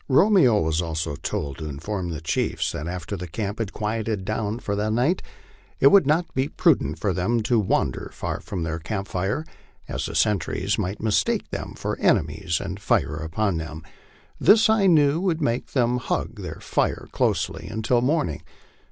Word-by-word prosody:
Romeo 145 - +5
was 80 +1 +1
also 80 -3 -3
told 70 0 -4
to 80 -1 -5
inform 90 +6 -4
the 80 -2 -5
chiefs 80 - -1
that 75 - -5
after 90 +2 -4
the 90 -2 -6
camp 100 +5 -4
had 110 -4 -2
quieted 110 -2 -2
down 110 +1 -2
for 100 -4 -3
the 105 +1 0
night, 125 +11 +1 0.6
it 140 - +7
would 195 -8 +6
not 165 +4 +1
be 130 +1 +1
prudent 165 -3 +2
for 100 -3 0
them 110 +6 0
to 120 +1 +2
wander 100 - 0
far - - -4
from 90 -4 -5
their 80 0 -3
camp 100 +4 -4
tire, 95 - -1 0.4
as - - -3
the - - -6
sentries 105 -5 +1
might 95 +4 -3
mistake 110 -2 +1
them - - -5
for - - -3
ene - - +4
mies 80 -2 -2
and 95 0 -5
fire 95 -6 +1
upon 85 +4 -1
them. 80 0 -6 0.6
This 220 +1 +6
I 210 -3 +4
knew 155 -2 +4
would 175 -4 0
make 120 -5 -1
them 125 -2 +2
hug 125 - -3
their - - -6
fire - - -1
closely - - -1
until 115 +2 +1
morning. 130 - 0
105 Hz, 180 wpm, -24 LUFS, 85-130 Hz, 0.6 s, it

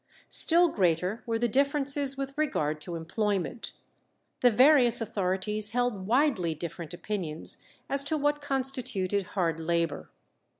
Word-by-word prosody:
Still 345 +2 +6
greater 180 - 0
were 230 -1 0
the 240 +1 0
differences 280 +2 +1
with 275 0 -5
regard 155 - -1
to 175 +2 -6
employment. 190 - -3 0.7
The 245 - +5
various 250 0 +5
authorities 210 -1 -2
held 245 -6 -1
widely 225 - +1
different 170 0 -7
opinions 175 -4 -4 0.3
as 275 0 +4
to 310 +2 -1
what 295 0 0
constituted 255 -8 -1 0.2
hard 165 -3 0
labour. 165 -2 -2
215 Hz, 125 wpm, -28 LUFS, 175-275 Hz, 0.7 s, Still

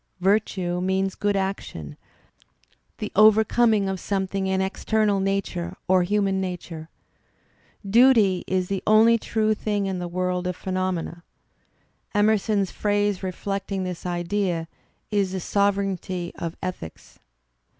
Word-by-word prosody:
Virtue 185 -2 +1
means 190 +1 0
good 205 -1 -1
action, 190 - -4 0.5
.' - - -40
the - - -5
overcoming 215 0 +4
of 190 -1 -2
something 195 0 -2
in 190 0 0
external 205 +1 +1
nature 195 -3 -2
or 185 0 +4
human 195 +1 +1
nature. 175 -3 -6 1.0
Duty 220 -4 +5
is 185 -1 0
the 195 0 -2
only 225 +2 +6
true 215 0 0
thing 205 -1 -2
in 190 -2 -2
the 175 - -4
world 180 +1 -2
of 180 - -3
phenom 185 -1 -1
ena. 170 +1 -7 0.9
Emerson's 205 -1 +2
phrase 205 -2 0
reflecting 195 +1 -3
this 180 -2 -5
idea 175 -1 -1 0.4
is 200 -3 +1
"the 190 - -2
sovereignty 195 -2 -1
of 165 -1 -6
ethics.'' 180 - -7
190 Hz, 125 wpm, -24 LUFS, 180-205 Hz, 1.0 s, only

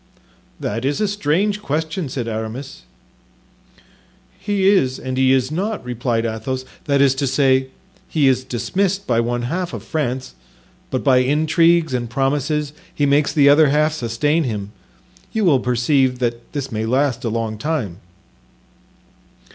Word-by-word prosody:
"That 115 +3 -3
is 140 +2 0
a 210 - +1
strange 205 +2 0
question," 155 -1 -2
said 125 -3 -4
Aramis. 115 +5 -6 1.5
"He 195 -1 0
is 135 -11 +3
and 130 0 -5
he 130 0 +3
is 130 0 +2
not," 200 - -3
replied 120 -1 -1
Athos; 120 +4 -3 0.2
"that 140 -2 +2
is 135 -2 +5
to 135 +1 -1
say, 130 0 +2 0.4
he 150 -4 +2
is 130 -1 +2
dismissed 190 - -1
by 115 -2 +1
one 120 +1 -1
half 175 +8 -3
of - - -7
France, 130 -5 -3 0.6
but 130 - -2
by 135 -3 +4
intrigues 160 +4 +3
and 120 -2 -2
promises 145 +3 -1 0.2
he 145 - 0
makes 140 +1 +3
the 145 -3 +4
other 145 +1 +6
half 150 +2 +2
sustain 145 +4 0
him; 105 -6 -4 0.6
you 220 -3 +1
will 145 -7 +4
perceive 125 +1 +1
that 120 -1 -3
this 140 -2 -4
may 110 0 -2
last 130 0 +1
a 115 - -1
long 110 -1 -3
time." 135 - -2
135 Hz, 150 wpm, -20 LUFS, 125-155 Hz, 1.5 s, other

